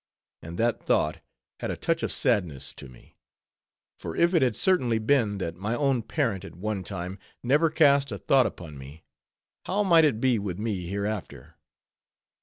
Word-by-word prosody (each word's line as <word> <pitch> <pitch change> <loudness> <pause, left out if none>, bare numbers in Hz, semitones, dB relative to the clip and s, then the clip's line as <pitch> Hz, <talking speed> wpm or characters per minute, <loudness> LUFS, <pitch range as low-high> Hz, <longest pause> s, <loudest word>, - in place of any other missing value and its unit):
And 85 +2 -8
that 115 +2 0
thought 75 - +1 0.4
had - - -3
a - - -3
touch 165 -1 0
of - - -1
sadness 85 - 0
to 65 - -11
me; 60 - -19 0.8
for 80 - -6
if 170 +2 +3
it 165 - +4
had 125 -4 +2
certainly 130 - +2
been, 110 -3 +1
that 85 -4 -3
my 105 +6 -2
own 135 -3 +1
parent, 115 - -1
at 95 - -10
one 100 +1 -3
time, 90 +1 -6 0.2
never 145 +6 +3
cast 140 -4 +4
a 100 - -3
thought 130 +3 +3
upon 75 -5 -9
me, 70 +4 -12 0.6
how 205 +3 +1
might 170 -4 +5
it 140 -8 +2
be 125 -2 +2
with 95 -4 -4
me 100 -5 -3
hereafter? 100 - -4
110 Hz, 175 wpm, -26 LUFS, 90-140 Hz, 0.8 s, might